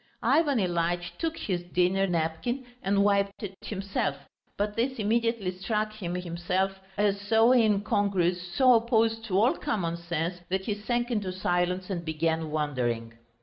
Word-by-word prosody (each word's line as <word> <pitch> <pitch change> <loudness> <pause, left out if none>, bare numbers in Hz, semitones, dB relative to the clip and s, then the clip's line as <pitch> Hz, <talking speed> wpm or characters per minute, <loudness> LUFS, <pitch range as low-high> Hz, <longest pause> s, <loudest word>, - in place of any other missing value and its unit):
Ivan 295 -5 +3
Ilyitch 175 -2 -1
took 330 0 -2
his 185 - -2
dinner 180 +2 +1
napkin 175 +10 -1 0.2
and 200 +1 +2
wiped 200 0 +1
it 195 -2 -4
himself, 195 -8 -2 0.4
but 205 +1 -1
this 260 +3 0
immediately 225 -2 +1
struck 210 +3 -2
him 180 -5 -4
himself 180 +2 -1 0.2
as 200 -1 +1
so 225 +3 +4
incongruous, 200 -6 +2
so 255 +6 +5
opposed 225 -1 +2
to 190 -4 0
all 240 +6 +4
common 175 - -2
sense, 170 +1 -3
that 190 +1 -1
he 210 - 0
sank 240 +4 -2
into 205 -5 -1
silence 180 +1 -1
and 175 -3 -3
began 160 0 -1
wondering. 125 -7 -1
195 Hz, 145 wpm, -28 LUFS, 175-220 Hz, 0.4 s, so